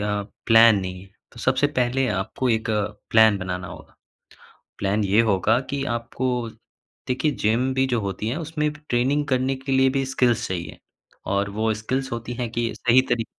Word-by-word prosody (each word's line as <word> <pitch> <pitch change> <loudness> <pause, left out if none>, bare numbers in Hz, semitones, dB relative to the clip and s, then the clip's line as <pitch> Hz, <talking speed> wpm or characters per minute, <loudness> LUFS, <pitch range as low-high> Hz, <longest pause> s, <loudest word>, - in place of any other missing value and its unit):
अ, 105 0 -1 0.2
plan 115 -1 +7
नहीं 90 -1 -6
है। 95 - -17 0.2
तो 120 - -11
सबसे 130 +4 +2
पहले 130 +2 +1
आपको 95 +7 -2
एक 110 -1 0 0.4
प्लान 110 -2 +5
बनाना 90 0 -4
होगा। - - -12 0.8
प्लान 100 +2 0
ये 100 +3 +3
होगा 105 +4 +2
कि 140 -1 -2
आपको, 120 0 -3 0.6
देखिए, 130 +4 +1
जिम 120 +3 0
भी 130 0 +2
जो 120 -3 0
होती 100 +1 -3
है, 125 - -2
उसमें 155 -1 -2
ट्रेनिंग 145 -1 -1
करने 130 0 +1
के 135 +1 -5
लिए 130 0 +4
भी 135 0 0
स्किल्स 125 -3 +1
चाहिए। 85 -3 -5 0.5
और 100 0 0
वो 110 +2 0
स्किल्स 130 +5 -3
होती 115 +1 -4
हैं 120 -2 -2
कि 115 0 -1
सही 125 +1 +4
तरी 120 -2 +1
120 Hz, 175 wpm, -23 LUFS, 105-130 Hz, 0.8 s, प्लान